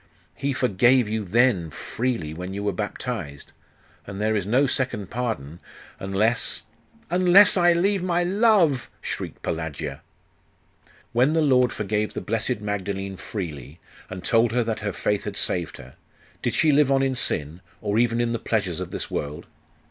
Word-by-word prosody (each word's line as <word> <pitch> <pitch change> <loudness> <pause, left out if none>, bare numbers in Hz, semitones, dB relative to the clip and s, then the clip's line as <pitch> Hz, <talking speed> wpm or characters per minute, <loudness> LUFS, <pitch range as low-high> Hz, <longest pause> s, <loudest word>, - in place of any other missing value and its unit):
'He 140 0 -2
forgave 125 0 +3
you 110 0 -2
then, 100 -4 +2
freely, 110 - -3
when 90 +3 -6
you 100 - -4
were 100 - +1
baptized: 100 - -5 0.6
and 100 0 -6
there 110 +1 +1
is 100 -3 -1
no 130 +6 +3
second 125 -7 -1
pardon 110 - -3 0.4
unless 105 +5 0 0.5
'Unless 185 +3 +6
I 175 -2 +5
leave 195 +3 +1
my 175 -1 +1
love!' 185 - +3
shrieked - - -6
Pelagia. 75 -3 -4 1.1
'When 125 +6 +3
the 160 -1 +3
Lord 125 -4 +4
forgave 105 +1 -2
the - - -1
blessed 115 +1 -1
Magdalene 100 -1 -3
freely, 80 - -7 0.3
and 95 -1 -7
told 115 0 +3
her 125 0 +2
that 115 -1 -2
her 105 -1 -2
faith 105 +1 -1
had 100 -1 -5
saved 85 -4 -1
her 65 0 -12 0.5
did - - -1
she 160 -1 +4
live 145 -1 +4
on 135 0 +3
in 135 -1 +1
sin, 80 - -1 0.2
or 105 +1 0
even 120 -1 +2
in 120 0 0
the 115 - -2
pleasures 100 -7 -1
of - - -5
this - - -5
world? 75 +1 -4
110 Hz, 165 wpm, -24 LUFS, 95-130 Hz, 1.1 s, Unless